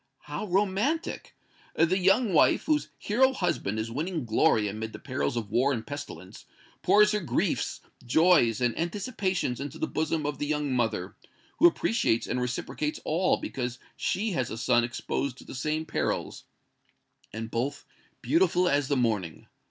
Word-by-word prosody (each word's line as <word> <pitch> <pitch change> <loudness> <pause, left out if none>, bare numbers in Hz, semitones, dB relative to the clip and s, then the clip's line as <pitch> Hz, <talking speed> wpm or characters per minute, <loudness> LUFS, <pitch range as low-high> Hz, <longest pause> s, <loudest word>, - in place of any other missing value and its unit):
"How 215 - -5
romantic! 205 - -1 0.4
The 170 +4 +3
young 195 +3 +3
wife, 155 - +4
whose 305 -1 0
hero 260 +6 +2
husband 175 - -1
is 110 +1 -3
winning 155 +3 -3
glory 110 -1 +3
amid 110 +2 -5
the - - -6
perils 130 -2 -2
of 110 -3 -4
war 125 +5 +3
and 115 -4 -3
pestilence, 145 0 -8 0.4
pours 210 0 +5
her 210 - +1
griefs, 170 - -1 0.2
joys 125 - +4
and 120 -2 +1
anticipations 185 - -2
into 140 0 -6
the - - -1
bosom 155 -1 -1
of 145 -2 -3
the 145 - -2
young 150 -2 -1
mother, 110 -6 -1 0.4
who 345 - +9
appreciates 225 - +1
and 125 - -2
reciprocates 130 +4 -3
all, 175 +4 +2
because 125 -2 -4 0.2
she 210 +4 -1
has 130 -9 -1
a 110 - -5
son 120 0 +3
exposed 125 +2 -3
to - - -12
the - - -10
same 155 +4 -2
perils - - -2 0.9
and 110 +1 -6
both 125 +5 -2 0.4
beautiful 305 - +3
as 140 -3 +2
the 140 - +1
morning! 105 -9 -1
145 Hz, 160 wpm, -28 LUFS, 120-185 Hz, 0.9 s, who